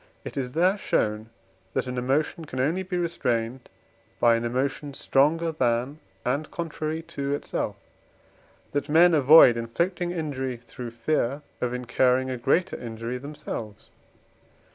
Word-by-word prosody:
It - - -7
is 125 -2 -3
there 185 +5 +3
shown, 105 - 0 0.5
that - - +1
an 125 0 -4
emotion 145 +6 0
can 130 -3 -6
only 160 +8 +1
be 185 -1 -3
restrained 125 -8 -1 0.5
by 120 -1 +5
an 115 - -1
emotion 135 +4 -2
stronger 160 +6 +2
than, 130 0 0 0.3
and 140 +5 -1
contrary 160 -1 -4
to 140 -3 -3
itself, - - -3
and 145 - -10
that - - -18
men 170 +2 +6
avoid 145 -4 +8
inflicting 170 +10 -1
injury 140 -7 -3
through 120 0 -8
fear 135 +3 -1 0.2
of 125 - 0
incurring 125 +1 +1
a 130 - -3
greater 165 +9 +1
injury 115 +1 -5
themselves. 140 -7 -7
135 Hz, 140 wpm, -26 LUFS, 125-160 Hz, 0.5 s, avoid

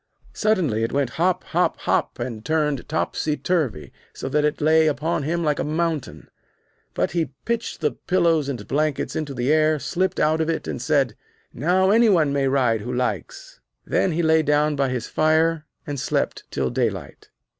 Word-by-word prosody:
Suddenly 180 - +1
it 115 - -1
went 140 -3 0
hop, 180 +2 0
hop, - - 0
hop, - - 0
and 120 -3 -5
turned 150 -3 -1
topsy 155 -1 -1
turvy, 130 - -1 0.2
so - - -6
that 150 +2 +1
it 150 0 0
lay 155 +1 +4
upon 155 +3 0
him 170 +4 -1
like 150 -2 0
a - - 0
mountain. 155 - -2 0.7
But - - 0
he 165 -3 -2
pitched 235 -5 -2
the 150 -2 +1
pillows 165 -5 +1
and 120 -7 -5
blankets 150 0 -1
into 145 -3 -3
the 125 +4 +1
air, 155 0 +3
slipped 185 +5 -1
out 155 +1 +2
of 160 - -1
it, 165 - -2
and - - -4
said: 140 -7 +1 0.4
'Now 185 +8 +2
any 230 +1 +5
one 155 -7 +3
may 140 -1 +1
ride 125 -5 +2
who 125 - -5
likes.' - - -4 0.3
Then 185 - +1
he 170 +2 0
lay 160 0 +4
down 150 0 +2
by 135 -1 +1
his 125 -2 -3
fire 160 0 +1 0.2
and 145 -2 -4
slept - - -2
till 65 -2 -2
daylight. - - -3
155 Hz, 180 wpm, -23 LUFS, 135-165 Hz, 0.7 s, any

